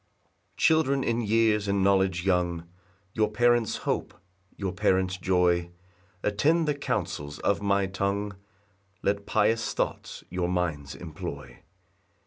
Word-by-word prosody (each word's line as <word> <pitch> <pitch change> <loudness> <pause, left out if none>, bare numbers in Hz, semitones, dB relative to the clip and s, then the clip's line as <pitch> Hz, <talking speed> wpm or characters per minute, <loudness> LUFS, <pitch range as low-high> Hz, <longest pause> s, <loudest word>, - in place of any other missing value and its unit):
1 - - -40 0.3
Children 150 -4 +3
in 115 0 0
years 110 -1 +2
and 100 -1 +1
knowledge 95 -2 +2
young, 85 -3 0 0.5
Your 110 -1 +1
parents' 120 0 +2
hope, - - -2 0.4
your 95 -2 -2
parents' 95 -2 +1
joy, 90 -1 +1 0.5
Attend 155 +11 +2
the 150 - +2
counsels 75 - -3
of 100 - 0
my 100 -1 +2
tongue, 100 +2 -2 0.7
Let 100 0 0
pious 115 -1 +1
thoughts - - -3
your 90 -1 -1
minds 80 -6 -2
employ. 80 -3 -8
100 Hz, 120 wpm, -27 LUFS, 90-110 Hz, 0.7 s, Children